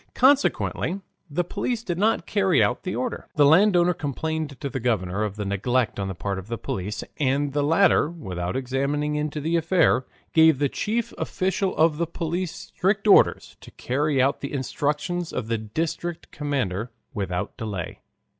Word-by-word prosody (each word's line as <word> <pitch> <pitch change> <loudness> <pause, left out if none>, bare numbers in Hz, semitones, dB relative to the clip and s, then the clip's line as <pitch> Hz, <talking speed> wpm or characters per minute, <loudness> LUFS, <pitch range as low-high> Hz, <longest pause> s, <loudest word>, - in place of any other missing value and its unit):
Consequently 265 -7 +2 0.3
the 165 +5 0
police 220 +6 -3
did 175 -5 -3
not 220 +3 +2
carry 195 -7 +3
out 125 - 0
the 185 - -3
order. 250 -2 -3
The 145 -3 +5
landowner 175 +2 +5
complained 155 -1 -3
to 140 - -3
the 135 0 -4
governor 105 -5 0
of 105 -2 -3
the 105 -1 -4
neglect 115 +5 0
on 100 - -2
the 95 - -4
part 100 +2 -3
of 95 - -10
the 115 +1 -3
police, 100 +1 -4 0.2
and 140 0 +1
the 145 - +1
latter, 165 +2 +4
without 90 - -5
examining 140 +3 -1
into 150 0 -2
the 160 +3 0
affair, 165 -5 +2 0.3
gave 160 -2 +6
the 145 0 +1
chief 230 - -2
official 190 0 -1
of 160 -1 +4
the 170 +1 0
police 170 +1 -3 0.2
strict 200 +3 +1
orders 200 - +4
to - - -12
carry 140 +2 -1
out 135 +3 +2
the 140 - -5
instructions 150 +5 -2
of 115 -3 -4
the 115 -1 0
district 160 +9 -4
commander 125 -8 -2 0.2
without 95 -5 -3
delay. 105 -8 -5
145 Hz, 170 wpm, -24 LUFS, 120-175 Hz, 0.3 s, gave